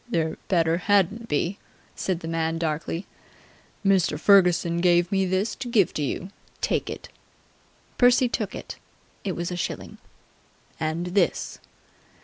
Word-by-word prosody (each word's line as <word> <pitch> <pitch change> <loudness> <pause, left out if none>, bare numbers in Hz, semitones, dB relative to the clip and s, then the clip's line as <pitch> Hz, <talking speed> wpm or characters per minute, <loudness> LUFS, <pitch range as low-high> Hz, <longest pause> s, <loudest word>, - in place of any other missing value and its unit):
"There 160 -7 0
better 165 -3 +2
hadn't 205 +4 +2
be!" 170 +5 -1 0.4
said 180 -3 -2
the 165 - -6
man 165 0 -1
darkly. 165 +2 -2 0.8
"Mr. 190 -6 +3
Ferguson 175 -2 +4
give 175 0 +3
me 195 -1 +2
this 190 +4 0
to 265 - -5
give 215 -6 +3
to - - -2
you. 175 +7 -3 0.3
Take - - 0
it!" - - -7 0.9
Percy 245 +1 +5
took 215 -4 -3
it. - - -8 0.5
It 195 - -2
was 175 +1 -3
a - - -2
shilling. 175 - -5 0.8
"And 160 +2 -1
this." 200 - +1
180 Hz, 135 wpm, -25 LUFS, 165-200 Hz, 0.9 s, Percy